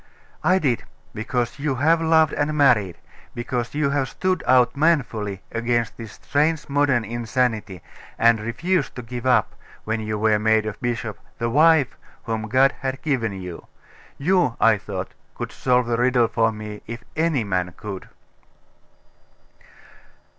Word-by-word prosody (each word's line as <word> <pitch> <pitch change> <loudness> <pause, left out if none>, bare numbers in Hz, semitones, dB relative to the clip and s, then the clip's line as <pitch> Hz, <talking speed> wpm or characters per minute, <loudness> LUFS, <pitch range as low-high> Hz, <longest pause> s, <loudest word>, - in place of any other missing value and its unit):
'I 185 - +4
did, 130 - 0 0.3
because 120 +3 -2
you 140 -1 -1
have 160 +6 +3
loved 160 -1 +4
and 150 +1 -1
married; 115 - +3 0.4
because 120 +1 -3
you 150 -2 +1
have 140 -3 0
stood 185 +6 -1
out 125 0 +4
manfully 120 - 0
against 115 0 -1
this 115 -3 -9
strange 150 +2 0
modern 140 -5 +2
insanity, 115 -4 -2 0.3
and 115 -1 +4
refused 170 +12 -1
to 125 - -6
give 120 +2 -5
up, 125 - +3 0.3
when 110 +1 -2
you 110 0 -3
were 105 0 +2
made 110 0 +2
a 110 - -3
bishop, 115 -3 -4 0.2
the 115 0 -1
wife 155 -1 +4 0.2
whom 110 -1 -3
God 130 +3 +4
had 135 0 -3
given 125 -9 0
you. 90 -3 -8 0.5
You, 175 -5 +2
I 115 -2 +4
thought, 95 -2 -6 0.2
could - - -5
solve 125 -1 +1
the 120 0 0
riddle 120 -1 +3
for 115 0 +1
me, 105 -1 -8
if 115 +2 -7
any 160 -6 +1
man 90 -3 -1
could. 100 -3 -7
120 Hz, 145 wpm, -23 LUFS, 110-140 Hz, 0.5 s, I